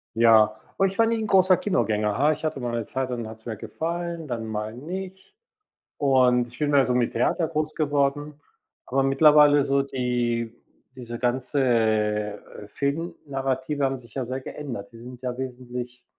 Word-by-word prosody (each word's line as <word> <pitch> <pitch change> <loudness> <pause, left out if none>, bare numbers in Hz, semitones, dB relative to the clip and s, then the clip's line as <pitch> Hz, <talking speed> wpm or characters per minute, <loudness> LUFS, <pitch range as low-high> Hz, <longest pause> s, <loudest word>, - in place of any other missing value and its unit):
Ja. 110 -2 +5 0.2
Oh, 195 - +3
ich 195 0 -2
war 230 - +5
nie 230 0 +1
'n 220 -1 -2
großer 185 -2 +5
Kinogänger, 105 - 0
ha 150 +3 +4
ich 155 - -4
hatte 155 -3 -2
mal 120 -1 -3
'ne 115 -2 -2
Zeit, 130 +2 -3
dann 120 -2 -4
hat 110 0 -10
es 110 - -23
mir 110 -3 -5
gefallen, 170 +3 -4
dann 115 -3 -4
mal 110 0 -4
nicht, 190 - -8 0.6
und 125 -3 +3
ich 120 - -15
bin 150 -1 0
mehr 140 -3 +4
so 125 - 0
mit 120 -1 +1
Theater 155 +7 +1
groß 155 -1 -2
geworden. 145 0 -1 0.5
Aber 135 +2 +1
mittlerweile 145 +1 +6
so 140 0 +2
die 120 -3 -1 0.4
diese 120 -2 -7
ganze 110 -5 +1 0.3
Film-Narrative 140 -1 -2
haben 135 -1 0
sich 120 -2 -18
ja 130 -2 -2
sehr 130 +2 -4
geändert. 120 -8 -7
Sie 115 - -14
sind 125 +1 -11
ja 125 -1 -3
wesentlich, 125 -1 -6
130 Hz, 175 wpm, -25 LUFS, 120-150 Hz, 0.6 s, mittlerweile